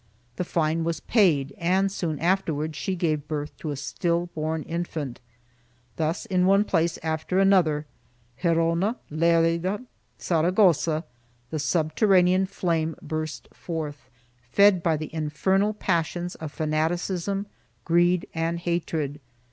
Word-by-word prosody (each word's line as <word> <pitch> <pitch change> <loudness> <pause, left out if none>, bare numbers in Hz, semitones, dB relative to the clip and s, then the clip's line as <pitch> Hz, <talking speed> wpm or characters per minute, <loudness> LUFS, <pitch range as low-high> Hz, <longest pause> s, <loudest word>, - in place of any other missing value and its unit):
The - - 0
fine 165 -1 0
was 165 -1 -1
paid 160 - +2
and 190 +3 +2
soon 165 -6 -2
afterwards 160 -3 0
she 185 +5 -2
gave 155 -4 -1
birth 150 -1 -4
to 155 - -5
a 145 - -2
still 170 +5 -1
born 155 0 -2
infant.2 160 -7 -4 0.8
Thus 160 +2 -1
in 185 -1 +2
one 195 +1 +5
place 170 -5 +1
after 160 +3 -1
another 180 -6 +3 0.3
— 120 0 -32
Gerona, 170 +5 +2 0.2
Lerida, 170 +6 +2 0.3
Saragossa 170 -2 +2 0.2
— 120 0 -37
the 155 - -2
subterranean 180 +4 +3
flame 165 -4 -1
burst 155 -2 -5
forth, 150 -6 -6 0.3
fed 185 +10 +4
by 165 -2 +1
the 155 0 -7
infernal 190 +7 +1
passions 175 -2 -1
of 155 -2 -7
fanaticism, 175 +6 -1 0.4
greed 175 +1 +3
and 165 +1 -1
hatred. 165 -4 -2
165 Hz, 125 wpm, -25 LUFS, 155-180 Hz, 0.8 s, one